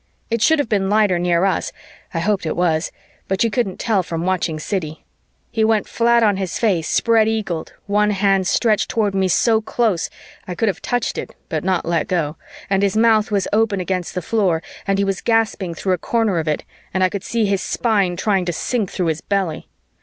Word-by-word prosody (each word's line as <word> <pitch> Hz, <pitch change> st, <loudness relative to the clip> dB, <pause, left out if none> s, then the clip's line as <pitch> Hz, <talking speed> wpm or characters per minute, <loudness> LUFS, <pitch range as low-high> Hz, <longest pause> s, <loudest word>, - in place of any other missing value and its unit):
It 230 Hz, -1 st, 0 dB
should 320 Hz, +8 st, +5 dB
have 290 Hz, -, 0 dB
been 195 Hz, -3 st, 0 dB
lighter 205 Hz, -4 st, +3 dB
near 175 Hz, +1 st, +2 dB
us 195 Hz, -, 0 dB, 0.4 s
I -, -, -4 dB
hoped 195 Hz, -2 st, 0 dB
it -, -, -2 dB
was, 165 Hz, -2 st, +1 dB, 0.4 s
but 190 Hz, +2 st, +1 dB
you 230 Hz, -, +1 dB
couldn't 210 Hz, -6 st, -1 dB
tell 215 Hz, -5 st, +1 dB
from 165 Hz, -1 st, -4 dB
watching 180 Hz, -4 st, 0 dB
Siddy; 155 Hz, -2 st, -4 dB, 0.5 s
he 225 Hz, -2 st, +1 dB
went 220 Hz, -1 st, +2 dB
flat 235 Hz, 0 st, +3 dB
on 205 Hz, -3 st, +3 dB
his 190 Hz, -2 st, -3 dB
face, 185 Hz, -8 st, +1 dB
spread 225 Hz, -2 st, +3 dB
eagled, 200 Hz, -7 st, -2 dB
one 210 Hz, +1 st, +2 dB
hand 195 Hz, -2 st, +2 dB
stretched 215 Hz, +1 st, +2 dB
toward 215 Hz, -5 st, 0 dB
me 190 Hz, -1 st, +1 dB
so 220 Hz, +5 st, +3 dB
close, 215 Hz, -6 st, 0 dB, 0.4 s
I 180 Hz, -, -4 dB
could 225 Hz, +4 st, +1 dB
have 190 Hz, -, -4 dB
touched 245 Hz, -2 st, -1 dB
it -, -, -7 dB
(but 155 Hz, -3 st, -2 dB
not 185 Hz, -1 st, 0 dB
let 170 Hz, -1 st, 0 dB
go!), 165 Hz, -5 st, -1 dB, 0.3 s
and 195 Hz, 0 st, +1 dB
his 200 Hz, +1 st, +1 dB
mouth 220 Hz, -1 st, +4 dB
was 200 Hz, -2 st, 0 dB
open 215 Hz, -2 st, +2 dB
against 180 Hz, 0 st, -3 dB
the 180 Hz, -, -2 dB
floor 180 Hz, -6 st, +1 dB, 0.2 s
and 195 Hz, 0 st, +2 dB
he 200 Hz, -, +1 dB
was 195 Hz, -1 st, -2 dB
gasping 220 Hz, -6 st, 0 dB
through 185 Hz, +3 st, 0 dB
a 180 Hz, -, -1 dB
corner 220 Hz, -5 st, 0 dB
of 160 Hz, -, -3 dB
it 150 Hz, -, -1 dB, 0.3 s
and 190 Hz, 0 st, +1 dB
I 185 Hz, -, +4 dB
could 200 Hz, 0 st, -5 dB
see 230 Hz, -2 st, 0 dB
his 195 Hz, -2 st, 0 dB
spine 200 Hz, -6 st, +1 dB
trying 195 Hz, -1 st, +1 dB
to 175 Hz, -, -1 dB
sink 220 Hz, +1 st, -1 dB
through 180 Hz, -, -2 dB
his 160 Hz, -1 st, -1 dB
belly. 190 Hz, -6 st, -2 dB
195 Hz, 215 wpm, -20 LUFS, 180-220 Hz, 0.5 s, should